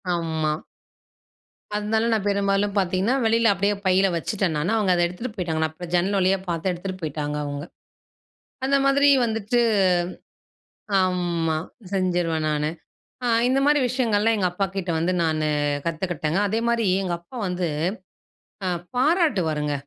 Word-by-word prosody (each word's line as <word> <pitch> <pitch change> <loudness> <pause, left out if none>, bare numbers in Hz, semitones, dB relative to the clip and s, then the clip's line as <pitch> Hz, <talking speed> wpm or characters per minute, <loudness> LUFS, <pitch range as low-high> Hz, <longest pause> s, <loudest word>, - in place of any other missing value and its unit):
ஆமா. 160 -2 -1 1.2
அதனால 220 +2 0
நான் 215 -2 0
பெரும்பாலும் 200 0 +1
பாத்திங்கன்னா, 190 +6 +1
வெளியில 225 -1 +4
அப்படியே 200 +2 +1
பையில 190 +1 +4
வச்சுட்டே 195 +4 -1
நானு. - - 0
ஆனா 220 +6 +1
அவங்க 200 -4 +2
அத 175 - +1
எடுத்துட்டு 210 +6 -6
போய்ட்டாங்க 165 -4 -2
நான் 170 +2 -7
ஜன்னல் 195 +3 +1
வழியா 190 +1 +3
பாத்தே 170 +2 -1
எடுத்துட்டு 185 +1 -5
போய்ட்டாங்க. 150 -1 -3
அவங்க 145 0 -4 1.0
அந்த 275 +1 +3
மாதிரி 280 +1 +4 0.2
வந்துட்டு, 225 +2 0 1.4
ஆமா 175 -3 0 0.4
செஞ்சுருவே 175 -4 0
நானு 150 0 0 0.8
இந்த 265 +1 +2
மாரி 295 0 +4
விஷயங்கள்லா 225 -3 +2
எங்க 190 -3 +1
அப்பாகிட்ட 190 -1 -3
வந்து 170 +3 +1
நானு 155 -1 0 0.4
கத்துக்கிட்டேங்க. 165 0 -2
அதேமாரி 230 +1 0 0.2
எங்க 180 -2 -2
அப்பா 170 +9 -14
வந்து 180 -1 -1 1.0
அ - - 0 0.3
"பாராட்டுவாருங்க 200 - +1
185 Hz, 125 wpm, -24 LUFS, 165-215 Hz, 1.4 s, வெளியில